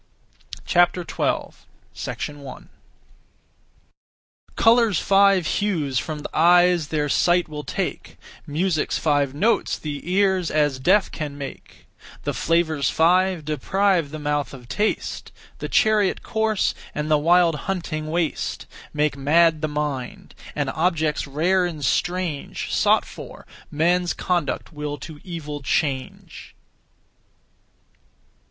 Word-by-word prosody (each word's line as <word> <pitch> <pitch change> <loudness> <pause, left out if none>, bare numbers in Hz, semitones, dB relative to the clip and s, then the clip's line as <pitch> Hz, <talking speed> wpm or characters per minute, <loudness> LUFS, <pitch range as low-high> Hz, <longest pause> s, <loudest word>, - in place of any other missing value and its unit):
12. 175 -1 0 0.6
1. 145 -2 -11 1.9
Colour's 225 -5 +4
five 195 -2 +4
hues 155 -11 0
from 155 +1 -5
th' - - -7
eyes 175 0 +4
their 150 -1 -1
sight 175 +4 +2
will 150 -1 -7
take; - - -4 0.3
Music's 160 +2 0
five 145 -3 +1
notes 220 +10 +1
the 150 +3 -6
ears 190 -2 +2
as 145 -3 +1
deaf 190 +9 +3
can 145 -3 -5
make; 140 -2 -9 0.4
The - - -2
flavours 160 -5 +1
five 180 0 +2
deprive 170 +3 +1
the 155 - -7
mouth 145 -2 -2
of 125 -2 -13
taste; 210 - -2 0.3
The - - -5
chariot 215 -3 +2
course, 220 -2 0 0.2
and 150 +1 -2
the 150 - +4
wild 170 +2 +4 0.2
hunting 155 -5 -3
waste 165 -1 -2 0.3
Make 150 -1 +1
mad 155 +3 +3
the 155 - 0
mind; 145 -4 -4 0.2
and - - -1
objects 160 -3 0
rare 175 +6 +1
and 155 -5 -5
strange, 175 0 -2
Sought - - +3
for, - - -11 0.2
men's 175 +3 +1
conduct 170 -4 -2
will 150 -1 -4
to 155 0 -10
evil 150 -5 -6
change. 135 -1 -3
160 Hz, 115 wpm, -23 LUFS, 150-180 Hz, 1.9 s, Colour's